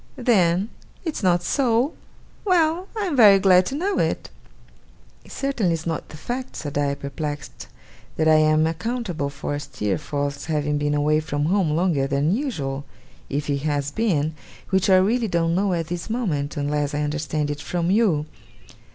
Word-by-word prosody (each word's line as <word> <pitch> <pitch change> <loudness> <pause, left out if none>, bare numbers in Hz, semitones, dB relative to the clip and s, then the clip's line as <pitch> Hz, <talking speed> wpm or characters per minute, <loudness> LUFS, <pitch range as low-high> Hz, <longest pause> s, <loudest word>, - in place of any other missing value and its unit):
Then, 195 -5 +2 0.4
it's 320 - -3
not 175 -3 +2
so? 245 - +1 0.5
Well! 355 -1 +2
I 425 - 0
am 345 -6 -1
very 210 -6 +8
glad 185 -1 +5
to 270 - -3
know 385 +7 0
it.' - - -1 0.9
'It - - -16
certainly 240 -11 0
is 165 0 -4
not 165 -1 -3
the 150 - -10
fact,' 250 - -5
said 145 -2 -5
I, 140 -1 +1
perplexed, 145 +1 -6 0.5
'that 160 - +1
I 155 0 +6
am 155 0 +4
accountable 175 - -2
for 145 +1 -4
Steerforth's 145 +2 -3
having 150 -2 0
been 145 0 0
away 150 +1 +2
from 145 -1 -2
home 185 0 +2
longer 165 -6 +1
than 145 +6 +1
usual 145 - -3 0.5
if 145 +2 -2
he 140 -1 -1
has 145 -1 -1
been: 160 -9 0 0.4
which 190 0 +2
I 190 - +7
really 225 +5 +2
don't 170 -3 +1
know 195 +2 +1
at 165 -1 -1
this 175 +3 -4
moment, 165 - -2
unless 145 0 -1
I 150 - 0
understand 150 0 -2
it 145 0 -5
from 170 +4 -1
you. 195 -9 +2
165 Hz, 170 wpm, -23 LUFS, 145-205 Hz, 0.9 s, very